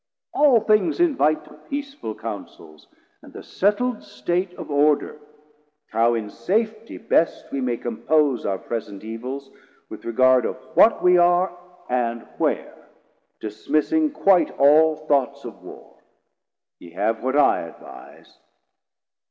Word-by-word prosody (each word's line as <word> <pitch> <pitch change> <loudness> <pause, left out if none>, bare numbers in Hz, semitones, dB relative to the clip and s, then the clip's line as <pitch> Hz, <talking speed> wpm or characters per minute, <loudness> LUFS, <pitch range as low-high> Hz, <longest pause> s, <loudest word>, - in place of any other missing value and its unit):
All 275 -6 +4
things 215 +11 +2
invite 210 - +2
To - - -16 0.2
peaceful 280 - -5
Counsels, 80 -1 -9 0.3
and - - -15
the - - -10
settl'd 215 +4 0
State 175 +9 -2
Of - - -8
order, 145 +1 +1 0.7
how 115 +2 +2
in 105 -2 -4
safety 215 - -2
best 165 - 0
we 135 - -3
may 125 -2 -1
280 115 -1 -7
Compose 150 -5 +2
our 95 -1 -1
present 105 -2 -6
evils, 130 +5 -7 0.4
with - - -10
regard 130 +2 +3
Of - - -4 0.2
what 200 +7 +5
we 180 0 +5
are 175 +1 +3 0.3
and 120 -2 -1 0.2
where, - - -2 0.5
dismissing 155 - 0
quite 195 -10 +3
All 155 +3 +5
thoughts 140 -4 0
of - - -10
Warr: - - -14 0.8
ye 85 -1 -14
have 105 +5 -1
what 130 +3 -1
I 145 - +4
advise. - - -13
145 Hz, 130 wpm, -22 LUFS, 115-195 Hz, 0.8 s, what